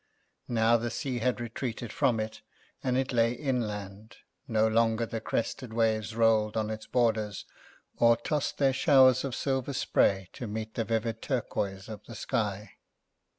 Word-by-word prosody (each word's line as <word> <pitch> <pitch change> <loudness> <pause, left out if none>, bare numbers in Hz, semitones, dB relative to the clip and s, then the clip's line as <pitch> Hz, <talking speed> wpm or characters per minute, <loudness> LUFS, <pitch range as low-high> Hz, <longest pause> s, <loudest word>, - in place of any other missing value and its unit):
Now 115 0 +3
the 120 +1 -3
sea 125 +1 -3
had 125 +2 0
retreated 120 -1 -5
from 125 -6 +2
it, 110 0 -5 0.4
and 130 -1 +1
it 130 0 -1
lay 115 0 +3
inland; 110 -6 -4 0.3
no 110 -3 +2
longer 115 +1 +2
the 115 0 -5
crested 115 +1 -3
waves 110 -1 0
rolled 110 -1 +3
on 110 0 -1
its 110 0 -6
borders, 110 -4 0 0.5
or 115 0 +5
tossed 150 -2 -2
their 135 -2 +3
showers 130 -1 +5
of 135 -3 -3
silver 135 0 -1
spray 95 -6 +2
to 125 -4 -6
meet 110 +1 -5
the 115 - -2
vivid 115 0 -1
turquoise 100 -7 -2
of 110 -3 -8
the - - -9
sky. 105 -2 -3
115 Hz, 155 wpm, -29 LUFS, 110-125 Hz, 0.5 s, or